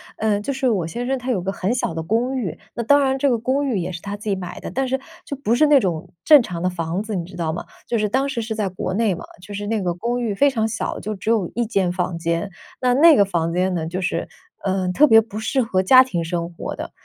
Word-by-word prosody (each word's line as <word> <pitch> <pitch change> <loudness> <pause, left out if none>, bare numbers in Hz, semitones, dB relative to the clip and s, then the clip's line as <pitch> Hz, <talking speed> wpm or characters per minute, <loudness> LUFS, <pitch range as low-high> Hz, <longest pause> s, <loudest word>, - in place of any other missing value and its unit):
呃， 215 -2 +1
就 230 +7 -3
是 265 -1 0
我 190 -8 0
先 240 +8 -4
生 265 +1 -1
他 250 +1 -2
有 200 -7 0
个 190 +2 -2
很 195 +2 -1
小 235 - -1
的 160 - -3
公 235 +10 0
寓， 200 -10 -3 0.2
那 - - -2
当 285 +5 +5
然 265 0 +1
这 280 - +3
个 240 - +2
公 265 +5 0
寓 245 -6 0
也 185 0 -2
是 170 -1 -7
他 200 0 -5
自 210 +1 -6
己 200 - +2
买 180 -2 -7
的， - - -6
但 265 0 -1
是 265 +1 0 0.3
就 280 - -4
不 255 -5 -1
是 285 +6 +4
那 295 -1 +6
种 170 -6 -2
正 300 -3 +8
常 175 -6 -5
的 185 - +2
房 175 +2 -3
子， 220 0 -5
你 175 -3 -2
知 185 - -12
道 165 -2 -1
吗？ 170 - -5 0.2
就 235 - 0
是 215 -1 +1
当 265 +6 +1
时 255 -4 -2
是 220 0 -4
在 210 -3 -1
国 185 0 -4
内 215 0 +2
嘛， - - -9 0.2
就 205 +3 -10
是 205 +1 -4
那 220 -1 0
个 175 -2 -1
公 235 +7 -2
寓 225 -4 -1
非 280 +8 +4
常 225 -5 0
小， 225 - -3
就 215 - -3
只 210 +2 -5
有 215 -6 +1
1 240 0 0
间 195 -5 0
房 180 -1 -2
间。 170 +3 -1 0.3
那 250 -1 +2
那 315 +4 +7
个 200 - +5
房 170 -4 -1
间 185 +1 +1
呢， 165 -3 -2
就 180 +3 -3
是， 185 - -2 0.4
呃， 190 -1 0
特 300 - +6
别 225 -4 +8
不 215 -1 -9
适 245 +4 0
合 195 -6 +1
家 255 +7 +8
庭 180 -10 -3
生 170 0 -3
活 - - -5
的。 - - -7
210 Hz, 305 characters per minute, -21 LUFS, 180-245 Hz, 0.4 s, 正